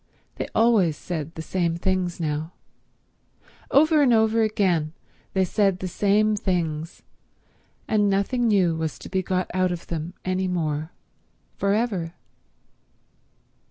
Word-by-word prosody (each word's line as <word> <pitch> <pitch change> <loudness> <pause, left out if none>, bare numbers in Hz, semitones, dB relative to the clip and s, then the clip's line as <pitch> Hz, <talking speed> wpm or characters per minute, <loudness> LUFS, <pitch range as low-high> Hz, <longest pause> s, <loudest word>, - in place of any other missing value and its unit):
They - - -3
always 215 -9 +3
said 160 -2 -5
the 160 - -6
same 170 -1 -1
things 180 0 -1
now—over 170 - -2
and 270 -4 +4
over 220 0 +3
again 180 -8 +1 0.4
they 190 -1 +2
said 195 0 +1
the 185 - -4
same 210 +3 +2
things, 165 -5 -2 0.8
and 210 -2 +2
nothing 200 +5 +1
new 185 -6 +3
was 160 -1 -3
to - - -10
be 190 - 0
got 185 0 -2
out 185 0 +1
of 175 -1 -5
them 165 +2 -5
any 185 0 0
more 155 -3 -2 0.6
for 200 0 +1
ever. 195 -7 -2
185 Hz, 125 wpm, -24 LUFS, 165-210 Hz, 0.8 s, and